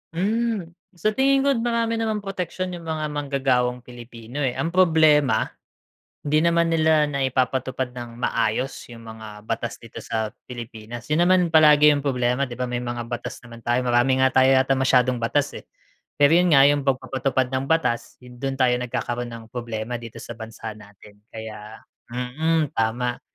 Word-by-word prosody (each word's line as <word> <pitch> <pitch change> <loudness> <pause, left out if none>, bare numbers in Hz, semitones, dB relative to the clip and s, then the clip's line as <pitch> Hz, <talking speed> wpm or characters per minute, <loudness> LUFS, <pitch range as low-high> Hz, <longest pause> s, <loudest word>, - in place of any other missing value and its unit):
Hmm. 210 -1 -1 0.2
Sa 215 +6 0
tingin 270 +3 +3
ko, 280 - +3
marami 230 -1 0
namang 215 -2 -1
proteksyon 185 -1 -4
yung 170 -2 -8
mga 155 -1 -2
manggagawang 130 -4 0
Pilipino, 120 +1 -10
eh, 130 -4 0
ang 165 - -2
problema, 155 -9 +4 0.8
hindi 150 +1 +1
naman 170 0 +3
nila 155 -2 +3
naipapatupad 130 -1 -1
ng 120 -1 -8
maayos 130 +5 0 0.2
yung 115 -1 -11
mga 110 -2 -10
batas 115 +1 -3
dito 115 - -12
sa 110 -1 -2 0.2
Pilipinas. 120 -1 -8
'Yon 155 +3 +2
naman 180 -2 +4
palagi 150 -1 +7
yung 145 - -1
problema, 125 0 +1
'di 120 - -8
ba? 125 - -1
May 120 0 -2
mga 120 -1 -4
batas 120 0 -5
naman 115 -1 -12
tayo, 120 +1 +2
marami 125 +2 +3
nga 130 - +5
tayo 130 0 +5
yata 135 +1 +3
masyadong 130 -1 +3
batas, 145 +5 0
eh. - - -12 0.5
Pero 145 0 +5
'yon 180 0 +3
nga 135 - +7
yung 145 0 +2
pagpapatupad 130 0 0
ng 130 +1 -1
batas, 160 -8 0
'yon 125 -1 -14
do'n 135 -1 -2
tayo 130 -2 +3
nagkakaroon 120 0 -3
ng 115 -1 -9
problema 120 -1 -4
dito 115 -1 -10
sa 120 - -7
bansa 110 -1 -7
natin, 105 0 -17
kaya 110 -1 -9 0.3
mm, 150 +5 -1
tama, 120 +2 -1
130 Hz, 165 wpm, -23 LUFS, 120-155 Hz, 0.8 s, palagi